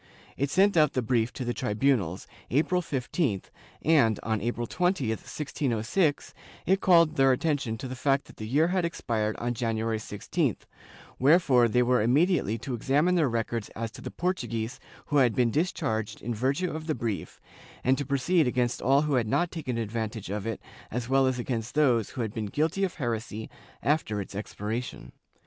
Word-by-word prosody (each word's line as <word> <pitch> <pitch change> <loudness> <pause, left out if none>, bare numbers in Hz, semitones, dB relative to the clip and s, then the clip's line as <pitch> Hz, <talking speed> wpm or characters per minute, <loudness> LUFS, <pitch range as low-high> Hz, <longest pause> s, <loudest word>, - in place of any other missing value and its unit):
It 140 +1 -1
sent 195 +5 +3
out 155 -3 +4
the 130 - 0
brief 115 0 +1
to 130 - -5
the 120 - -1
tribunals, 105 -7 0 0.2
April 170 +7 +2
15th 130 - -2 0.3
and, 135 -10 +4
on 110 -1 -1
April 120 +1 -2
20, 180 - 0
1606, 140 - -1 0.3
it 190 +1 +2
called 170 -4 +5
their 135 -1 +5
attention 135 -4 0
to 130 - -6
the 130 - -5
fact 135 +2 +1
that - - -16
the 110 - -6
year 150 +8 +3
had 185 -1 +1
expired 110 -10 -1
on 120 +1 -2
January 115 -1 -1
16th, 105 -1 -2 0.6
wherefore 135 -4 +5
they 125 +2 +3
were 125 -1 +3
immediately 135 - +2
to 125 +3 -5
examine 145 +9 +2
their 160 -6 +3
records 115 -1 -2
as 115 0 -4
to - - -11
the - - -5
Portuguese 125 -11 -3 0.3
who 145 - 0
had 125 -5 +4
been 120 -2 +2
discharged 115 - -1
in 120 - -3
virtue 135 +10 0
of 155 +1 -6
the 155 - 0
brief 115 -4 -4 0.4
and 130 +2 +4
to - - 0
proceed 140 +4 +2
against 125 -1 0
all 135 +3 +4
who 150 -1 0
had 120 -4 +2
not 175 +10 +1
taken 135 -8 -4
advantage 110 -2 -3
of 105 +1 -3
it 115 - -3 0.3
as 120 +1 -4
well 135 0 +4
as 130 -1 0
against 120 -1 -3
those 125 -8 +3
who 130 - -5
had 110 -2 -3
been 110 -2 -3
guilty 160 - 0
of 185 - -1
heresy 115 -5 -4 0.3
after 140 -8 +1
its 100 - -6
expiration. 105 +4 -5
125 Hz, 180 wpm, -28 LUFS, 115-150 Hz, 0.6 s, called